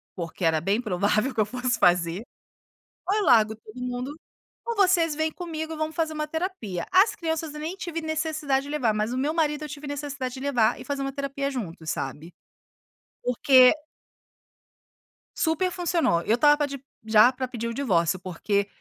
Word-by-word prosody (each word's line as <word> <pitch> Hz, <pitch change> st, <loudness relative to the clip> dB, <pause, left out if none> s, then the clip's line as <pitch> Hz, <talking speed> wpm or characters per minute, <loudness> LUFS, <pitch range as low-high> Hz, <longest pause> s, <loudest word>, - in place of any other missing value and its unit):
Porque 170 Hz, 0 st, -4 dB
era 160 Hz, -1 st, +2 dB
bem 200 Hz, +6 st, +1 dB
provável 210 Hz, +4 st, 0 dB
que 220 Hz, -, +2 dB
eu -, -, +2 dB
fosse 250 Hz, +3 st, -1 dB
fazer, 175 Hz, +2 st, +2 dB, 0.8 s
ou 415 Hz, +3 st, +2 dB
largo 220 Hz, -, +4 dB
todo 220 Hz, +2 st, -12 dB
mundo, 250 Hz, +3 st, -4 dB, 0.5 s
ou 470 Hz, 0 st, -2 dB
vocês 365 Hz, -6 st, +3 dB
vem 315 Hz, +1 st, 0 dB
comigo 320 Hz, -2 st, -5 dB
vamos 310 Hz, 0 st, -3 dB
fazer 320 Hz, -2 st, -1 dB
uma 305 Hz, 0 st, -3 dB
terapia, 310 Hz, -, -4 dB
as 385 Hz, +4 st, +5 dB
crianças 320 Hz, -2 st, -3 dB
nem 310 Hz, +4 st, -5 dB
tive 340 Hz, -3 st, -4 dB
necessidade 310 Hz, -3 st, -1 dB
de -, -, -8 dB
levar, 260 Hz, -7 st, +1 dB
mas 215 Hz, +3 st, -1 dB
o -, -, -2 dB
meu 285 Hz, +4 st, 0 dB
marido 305 Hz, -2 st, 0 dB
eu 300 Hz, -, -6 dB
tive 290 Hz, +1 st, -8 dB
necessidade 285 Hz, -3 st, -4 dB
de -, -, -7 dB
levar 250 Hz, -6 st, +2 dB
e -, -, -8 dB
fazer 285 Hz, -1 st, -3 dB
uma 275 Hz, 0 st, -2 dB
terapia 275 Hz, 0 st, -3 dB
juntos 170 Hz, -, -6 dB
sabe, 150 Hz, +6 st, -5 dB, 0.9 s
porque 250 Hz, +1 st, +6 dB, 1.6 s
super 325 Hz, +3 st, +1 dB
funcionou, 340 Hz, -, +1 dB
eu 225 Hz, -, +2 dB
estava 295 Hz, +3 st, +4 dB
de 280 Hz, 0 st, -6 dB
para 265 Hz, -, -24 dB, 0.2 s
já 220 Hz, +3 st, +6 dB
para 255 Hz, 0 st, -4 dB
pedir 235 Hz, -2 st, -5 dB
o 230 Hz, -, -3 dB
divórcio 185 Hz, -, +1 dB
porque 200 Hz, +3 st, -1 dB
275 Hz, 175 wpm, -25 LUFS, 215-315 Hz, 1.6 s, porque